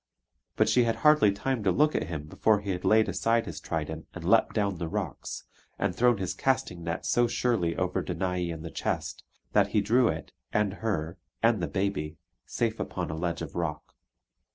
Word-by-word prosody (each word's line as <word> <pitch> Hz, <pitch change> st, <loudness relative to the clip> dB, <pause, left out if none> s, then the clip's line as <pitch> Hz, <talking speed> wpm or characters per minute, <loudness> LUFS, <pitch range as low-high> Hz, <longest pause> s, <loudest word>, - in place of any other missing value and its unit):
But -, -, +3 dB
she 125 Hz, -1 st, +4 dB
had 115 Hz, -, +1 dB
hardly 150 Hz, -9 st, +6 dB
time 120 Hz, +3 st, -2 dB
to -, -, +3 dB
look 150 Hz, +2 st, +3 dB
at -, -, -1 dB
him 80 Hz, -3 st, -4 dB
before 105 Hz, +7 st, +2 dB
he 100 Hz, -1 st, -3 dB
had 90 Hz, -1 st, -3 dB
laid 110 Hz, 0 st, +4 dB
aside 115 Hz, 0 st, +1 dB
his 80 Hz, -4 st, -6 dB
trident 80 Hz, 0 st, -4 dB
and -, -, -7 dB
leapt -, -, +3 dB
down 100 Hz, -4 st, 0 dB
the 85 Hz, -, -2 dB
rocks, 95 Hz, -4 st, -4 dB, 0.3 s
and 100 Hz, -3 st, -1 dB
thrown 120 Hz, -2 st, +4 dB
his 95 Hz, -2 st, -2 dB
casting 90 Hz, -10 st, -1 dB
net 85 Hz, 0 st, -3 dB
so 120 Hz, 0 st, +3 dB
surely 105 Hz, -10 st, 0 dB
over 90 Hz, 0 st, 0 dB
Danae 90 Hz, 0 st, -2 dB
and 80 Hz, -1 st, -6 dB
the 80 Hz, -, -6 dB
chest, -, -, -3 dB, 0.3 s
that -, -, +4 dB
he 105 Hz, -, +1 dB
drew 120 Hz, +4 st, +3 dB
it, -, -, -3 dB, 0.2 s
and 105 Hz, -2 st, +1 dB
her, 85 Hz, -6 st, -2 dB, 0.2 s
and 115 Hz, -4 st, +4 dB
the -, -, 0 dB
baby, 95 Hz, -6 st, -2 dB, 0.3 s
safe -, -, -1 dB
upon -, -, -3 dB
a -, -, -3 dB
ledge 85 Hz, 0 st, -2 dB
of 75 Hz, -, -7 dB
rock. 80 Hz, -4 st, -4 dB
95 Hz, 200 wpm, -28 LUFS, 85-110 Hz, 0.3 s, hardly